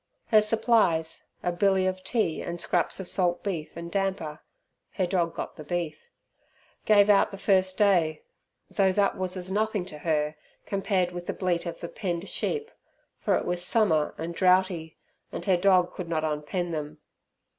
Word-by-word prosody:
Her 215 -2 +6
supplies, 215 -7 +1 0.2
a 175 - +1
billy 190 +1 +2
of 185 0 -2
tea 190 -5 0
and 170 0 -5
scraps 175 +1 0
of 190 - -6
salt 175 -2 0
beef 170 -6 -3
and 170 0 -7
damper 190 -6 -2 0.5
(her 185 - 0
dog 175 -2 0
got - - -6
the 155 - -8
beef), 160 -1 -4 0.8
gave 205 -1 +6
out 205 -1 +5
the 195 - -8
first 190 -1 +2
day, 175 -7 +3 0.4
though 195 -2 +2
that 200 0 +2
was 185 0 -2
as 185 +1 -4
nothing 210 -2 0
to 155 -5 -8
her 150 -1 0 0.3
compared 195 -2 0
with 175 0 -7
the - - -1
bleat 175 -2 -1
of 170 - -6
the 170 - -4
penned 175 -1 -4
sheep, 450 +1 -2 0.5
for - - +1
it - - -3
was 175 0 0
summer 180 -7 +2
and 165 +1 -4
droughty, 180 -3 +2 0.3
and - - -6
her 190 -3 +4
dog 180 0 +3
could 180 -3 -6
not 160 -2 0
unpen 155 +3 -2
them. 150 -1 -4
180 Hz, 175 wpm, -27 LUFS, 165-195 Hz, 0.8 s, Her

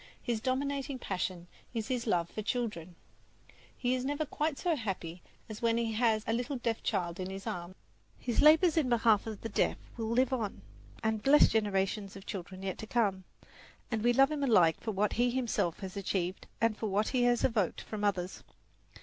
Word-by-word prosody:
His 235 -3 -1
dominating 275 +2 -1
passion 185 -5 -3 0.3
is 220 -1 -2
his 245 -2 -2
love 175 -5 +2
for 215 - -5
children. 210 -7 -3 0.8
He 250 0 0
is 255 -1 -1
never 290 +3 -1
quite 300 0 -2
so 345 -3 +1
happy 185 - -4 0.3
as 215 -1 -8
when 230 -1 +2
he 230 -1 0
has 220 -1 +2
a 225 - 0
little 245 +4 -1
deaf 235 -3 -2
child 180 -4 -1
in 185 0 -3
his 195 0 -7
arms. 175 +1 -5 0.4
His 240 -2 0
labours 315 +2 +6
in 290 -6 +3
behalf 225 -3 +3
of 215 -2 -6
the 225 - -4
deaf 205 - +1 0.2
will 225 -1 -2
live 255 +3 +2
on 220 -6 -3 0.4
and 220 -1 0
bless 285 +6 +6
generations 200 -1 0
of 195 - -10
children 190 0 -6
yet 190 -1 -3
to 220 - -6
come; 200 -5 0 0.7
and 220 -2 -1
we 240 - +5
love 270 +4 +5
him 295 -2 -2
alike 180 -11 +4
for - - -4
what 210 0 +1
he 245 +1 +2
himself 240 -9 -1
has 190 -1 -6
achieved 190 -2 -2
and 230 -1 +2
for 220 - -3
what 205 +2 +1
he 255 - +1
has 240 -1 +3
evoked 215 -7 +1
from 210 -1 -6
others. 190 -3 -1
220 Hz, 195 wpm, -31 LUFS, 195-245 Hz, 0.8 s, labours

